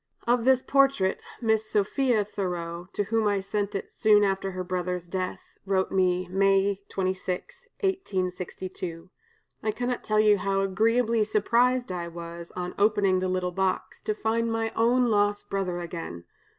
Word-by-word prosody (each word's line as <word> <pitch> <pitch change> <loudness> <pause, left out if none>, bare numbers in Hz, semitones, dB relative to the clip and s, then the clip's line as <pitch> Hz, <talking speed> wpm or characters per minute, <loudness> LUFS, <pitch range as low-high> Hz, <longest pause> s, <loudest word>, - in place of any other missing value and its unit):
Of 240 0 +2
this 260 -1 +4
portrait, 275 -9 +3 0.2
Miss 220 -1 +1
Sophia 215 +2 +1
Thoreau, 175 -3 -4
to 205 - 0
whom 220 +1 +1
I 205 -1 +2
sent 200 +1 -2
it 195 - -4
soon 210 -1 +4
after 195 -1 0
her 185 -1 -4
brother's 180 -1 -2
death, 185 +1 -5
wrote 190 -1 0
me, 185 -1 +2
May 195 +1 +2
26, 185 - -3
1862: 185 - -3 0.5
'I 215 - 0
cannot 245 +2 -2
tell 215 0 +1
you 210 -2 +5
how 195 0 0
agreeably 225 +4 +2
surprised 235 +3 +2
I 175 -1 -3
was, 170 0 -8
on 180 0 -4
opening 200 -3 +3
the 185 0 -1
little 185 -1 -1
box, 190 +1 -1
to 215 - -2
find 230 +1 0
my 225 0 -1
own 245 +2 +3
lost 205 0 +1
brother 190 -3 -1
again. 165 - -6
195 Hz, 150 wpm, -27 LUFS, 185-220 Hz, 0.5 s, you